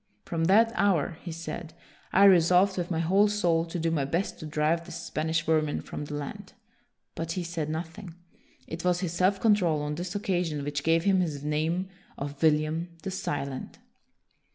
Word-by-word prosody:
From 165 -1 -1
that 220 +6 +5
hour," 175 -6 +1
he 175 - -6
said, 165 0 -6 0.2
" - - -28
I 195 - +5
resolved, 185 0 +6
with 175 -1 -3
my 170 - -1
whole 190 +6 +4
soul, 175 -6 +1
to 170 +1 -5
do 165 0 0
my 150 -4 +1
best 165 +8 -2
to 155 - -6
drive 155 +2 +1
this - - -9
Spanish 160 +2 -2
vermin 155 -2 +1
from 150 - -6
the 145 - -6
land." 185 +8 -7 0.6
But 165 0 -3
he 180 - -3
said 165 -3 -3
nothing. 165 +2 -6 0.5
It 165 +1 -6
was 180 0 +1
his 175 -3 -2
self 185 +3 +2
control 180 -9 +3
on 150 0 -2
this 175 +4 -5
occasion 175 -7 -1
which 145 0 -2
gave 165 +1 +3
him 195 -1 +3
his 150 -6 -2
name 160 +5 0 0.3
of 140 0 -6
William 155 +2 +2
the 195 - -3
Silent. 140 -7 -4
165 Hz, 185 wpm, -28 LUFS, 155-185 Hz, 0.6 s, resolved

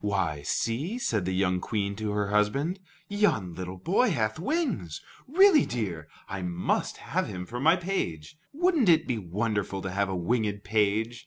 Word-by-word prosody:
"Why, 95 -8 0
see," 130 - -1
said 110 - -1
the 95 - -1
young 90 -1 +1
Queen 100 -2 -2
to 110 -1 -2
her 105 -1 -1
husband, 135 - +1 0.3
"yon 200 - +1
little 90 +1 -6
boy 195 - +2
hath 110 - -1
wings. 210 - -1 0.3
Really, 360 +2 +6
dear, 95 -10 -3 0.2
I 100 - -5
must 90 0 -1
have - - -2
him 90 -1 -5
for 120 +5 -6
my 160 +6 +5
page. 170 - -3 0.2
Would 350 +5 +2
n't 235 -10 +4
it 160 -2 +5
be 120 -4 -1
wonderful 100 +1 -2
to 95 - -3
have 100 +1 0
a 95 - -2
winged 105 +2 -1
page? 110 +2 +1
105 Hz, 175 wpm, -28 LUFS, -, 0.3 s, Really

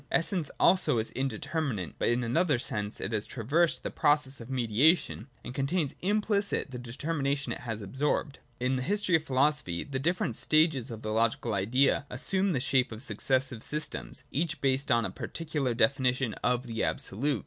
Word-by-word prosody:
Essence 165 -2 0
also 185 -9 +4
is 110 0 -1
indeterminate, 135 - -2
but - - +1
in 120 +1 +2
another 145 +5 +2
sense: 105 -3 -3
it 100 - -3
has 110 -1 -1
traversed 150 +9 +1
the - - -3
process 145 -3 +2
of 115 - -10
mediation 130 - +2 0.2
and 125 - -6
contains 140 +2 0
implicit 205 -4 0
the 125 - -6
determination 140 +3 -2
it - - -7
has 110 -3 -5
absorbed. 140 +6 -1 0.2
(2) - - 0
In 130 +1 +2
the - - -2
history 200 +5 0
of 160 - +2
philosophy 135 - +1
the 135 -2 -4
different 165 -5 0
stages 155 -5 +3
of 115 -1 -7
the 110 0 -2
logical 115 0 +1
Idea 125 +8 +2
assume 190 +9 0
the 135 - +1
shape 130 0 +2
of 110 +3 -4
successive 130 -4 0
systems, 150 -2 -3
each 160 +1 -1
based 135 0 +1
on 120 -3 +3
a - - -3
particular 150 -7 -3
definition 130 -2 +2
of 125 +1 +1
the 115 -2 -2
Absolute. 135 +5 -1
135 Hz, 175 wpm, -29 LUFS, 120-150 Hz, 0.2 s, also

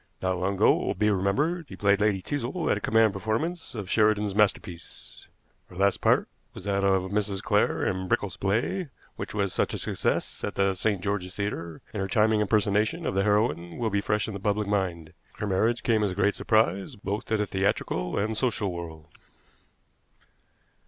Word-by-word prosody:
Not 95 -1 -1
long 95 +2 0
ago, - - +5
it - - 0
will - - 0
be 105 0 +2
remembered, 145 - 0
she - - -8
played 100 0 +2
Lady 100 -3 +1
Teazle 145 +4 -2
at - - +2
a - - -6
command 110 -1 +3
performance 125 - -3
of 105 -4 -5
Sheridan's 105 -1 +2
masterpiece. 100 -4 -2 0.4
Her 90 - -13
last 100 +2 +2
part - - +3 0.3
was - - -9
that 100 0 0
of 95 -1 +2
Mrs. 100 -2 -1
Clare - - +2
in 95 0 -1
Brickell's 95 -1 0
play, 115 - -1 0.3
which - - -6
was 100 -3 0
such - - 0
a - - -3
success - - -2
at - - -3
the 100 0 +2
St. 100 0 -1
George's 95 -2 -3
Theater, 85 -5 -4
and 105 - -2
her 95 - -1
charming 110 +1 +3
impersonation 105 0 +1
of - - -1
the 95 - +2
heroine 85 -5 +1
will 115 -2 -1
be 100 0 +1
fresh 105 0 0
in 110 - -5
the 100 - -5
public 105 +1 0
mind. 90 -6 -2 0.2
Her - - -3
marriage 110 +4 +1
came 110 -2 +2
as 105 - +2
a 90 - -5
great 100 +1 +2
surprise, 100 -3 +1
both 100 +1 -4
to 110 - 0
the 105 - 0
theatrical 95 - -1
and 110 +2 0
social 110 -4 0
world.' 80 -3 -7
100 Hz, 195 wpm, -27 LUFS, 95-110 Hz, 0.4 s, ago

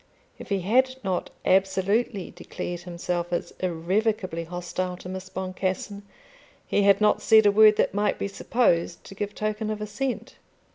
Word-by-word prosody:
If - - -10
he 200 -2 0
had 260 +7 +2
not 185 -2 -2 0.2
absolutely 195 +2 +1
declared 175 0 -6
himself 175 0 -4
as 175 - -2
irrevocably 185 +1 -1
hostile 180 +1 -4
to 180 - -10
Miss 185 0 -6
Boncassen 190 +2 -3 0.6
he - - +1
had 200 0 +4
not 210 0 +3
said 220 -1 +6
a 205 - +6
word 215 +1 +7
that - - +1
might 205 +1 +1
be - - -2
supposed 185 -5 0
to - - -11
give 205 +1 -4
token 215 0 -2
of 215 -1 -3
assent. 220 +5 -4
195 Hz, 155 wpm, -25 LUFS, 180-210 Hz, 0.6 s, word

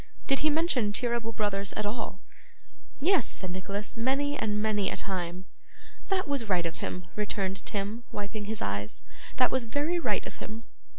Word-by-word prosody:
Did 275 -1 +4
he 310 - +4
mention 290 -9 +2
Cheeryble 235 -1 0
Brothers 200 -2 0
at 210 - -1
all?' 210 -2 -2 0.8
'Yes,' 330 - +4
said 185 -2 -1
Nicholas, 200 +4 -2
'many 275 +5 +2
and 210 -5 0
many 210 -2 +2
a - - -2
time.' 180 -1 -2 0.6
'That 380 -3 +2
was 275 -7 0
right 180 -3 +3
of 165 - -2
him,' 180 - -3
returned 195 -2 -1
Tim, 210 +3 -1
wiping 205 +1 -3
his 215 +1 -2
eyes; 100 -1 -2 0.3
'that 250 - +5
was 260 -2 +2
very 295 +9 +1
right - - +1
of - - -7
him. 220 +2 -6
215 Hz, 170 wpm, -30 LUFS, 195-255 Hz, 0.8 s, that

